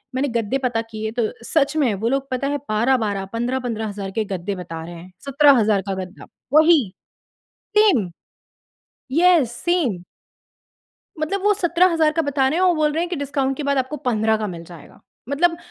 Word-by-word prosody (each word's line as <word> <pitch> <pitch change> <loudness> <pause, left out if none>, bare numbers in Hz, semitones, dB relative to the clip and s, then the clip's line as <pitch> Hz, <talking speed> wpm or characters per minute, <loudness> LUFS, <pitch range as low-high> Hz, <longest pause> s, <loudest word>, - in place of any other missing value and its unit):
मैंने 275 +2 0
गद्दे 225 +5 -1
पता 235 -2 0
किए 220 0 -4
तो 235 - +3 0.2
सच 290 -1 +1
में 260 -8 +2
वो 225 +4 -1
लोग 275 +1 -1
पता 255 +2 -1
है 290 +1 -1
12-12, 215 -3 +1
15-15 240 -2 -2
हज़ार 200 -1 -6
के 215 +2 -2
गद्दे 195 0 -4
बता 165 -3 -7
रहे 175 0 -9
हैं, 175 +2 -12
17,000 265 -8 +4
का 190 - -1
गद्दा 185 +2 -12 0.3
वही। 310 - +5 0.9
सेम। 355 - +4 1.0
Yes, 330 -5 +4
same. 245 - -1 1.2
मतलब 385 +5 -2
वो 415 0 +4
17,000 340 -4 +2
का 325 - 0
बता 280 -2 +1
रहे 315 - -1
हैं, 370 - +3
वो 355 - +4
बोल 305 -1 +1
रहे 325 +2 -1
हैं 350 - -2
कि 350 - -2
डिस्काउंट 275 -1 -2
के 300 - -4
बाद 280 -1 0
आपको 260 +3 -2
15 220 -2 +2
का 215 0 -3
मिल 170 -4 -7
जाएगा। 170 -3 -14 0.3
मतलब 335 +5 +1
260 Hz, 180 wpm, -21 LUFS, 215-310 Hz, 1.2 s, वही